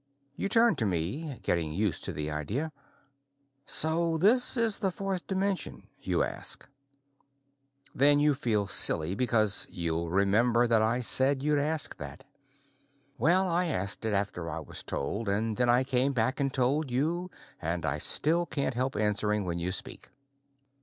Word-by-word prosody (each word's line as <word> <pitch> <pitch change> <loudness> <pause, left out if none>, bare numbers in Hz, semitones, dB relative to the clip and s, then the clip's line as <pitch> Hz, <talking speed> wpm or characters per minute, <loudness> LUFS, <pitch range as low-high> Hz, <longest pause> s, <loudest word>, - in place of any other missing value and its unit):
You 200 - -5
turn 230 +2 +1
to 110 - -3
me, 105 - -6
getting 80 -3 -2
used 100 0 -4
to - - -3
the 75 0 -7
idea. 105 - -6 1.0
"So 165 +1 +4
this 240 +9 +6
is 230 -3 +6
the 195 - -2
fourth 190 -1 -7
dimension?" 195 0 -5
you - - -3
ask. - - +2 1.3
Then 145 +2 +5
you 150 0 0
feel 110 -6 -3
silly, 80 -2 +7
because 110 -2 +3
you'll 85 -2 -5
remember 110 +6 -1
that 115 -2 0
I 115 +3 -2
said 135 +3 0
you'd 150 -1 -1
ask 155 +1 -1
that. - - -11 1.0
Well, 180 +8 +1
I 175 +1 -1
asked 100 - -1
it 110 -1 -4
after 100 -4 -5
I 80 +1 -8
was - - -8
told, 100 +10 -7
then 105 +2 -3
I 125 +2 +2
came 130 +1 0
back 130 +3 -2
and 135 -1 -3
told 135 +4 -2
it - - -14
to 125 - -11
you, 170 +7 -4 0.3
and 85 +1 -5
I 75 0 -4
still 170 - +2
can't 140 -3 -4
help 130 +2 -5
answering 105 -1 -3
when 85 -1 -6
you 90 +2 -4
speak. 95 - -6
125 Hz, 160 wpm, -26 LUFS, 100-155 Hz, 1.3 s, silly